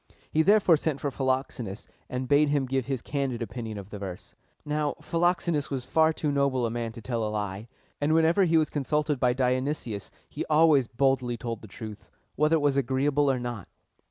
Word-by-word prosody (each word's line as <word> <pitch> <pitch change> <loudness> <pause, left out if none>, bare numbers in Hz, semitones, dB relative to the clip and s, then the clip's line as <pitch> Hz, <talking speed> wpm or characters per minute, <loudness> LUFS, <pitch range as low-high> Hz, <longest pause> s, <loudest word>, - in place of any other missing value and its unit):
He 160 - +3
therefore 195 -2 +5
sent 150 -2 -2
for 140 +1 -2
Philoxenus, 130 -6 -2 0.2
and 125 0 -3
bade 145 +1 +4
him 145 -2 +1
give 130 -1 -1
his 135 -3 -2
candid 135 -4 -2
opinion 115 -1 -6
of 100 +1 -9
the 105 - -6
verse. 95 -3 -7 0.3
Now, 150 0 -1
Philoxenus 170 -3 0
was 130 -3 -3
far 160 +3 +3
too 155 -2 -2
noble 140 -3 +1
a 115 - -1
man 115 -1 -3
to 115 -2 -10
tell 120 -2 -2
a 105 - -1
lie: 105 0 -4 0.3
and 150 +2 +2
whenever 165 +4 +4
he 165 -1 +3
was 155 -1 +1
consulted 150 0 0
by 125 -1 +3
Dionysius, 130 -4 -1 0.2
he - - -5
always 150 -4 +4
boldly 125 -1 +1
told 115 -2 -5
the 110 - -11
truth, 105 +1 -9 0.3
whether 150 +2 +3
it 160 - +1
was 140 -1 +2
agreeable 140 +2 +2
or 130 -2 +1
not. 120 -6 -5
135 Hz, 195 wpm, -27 LUFS, 120-150 Hz, 0.3 s, therefore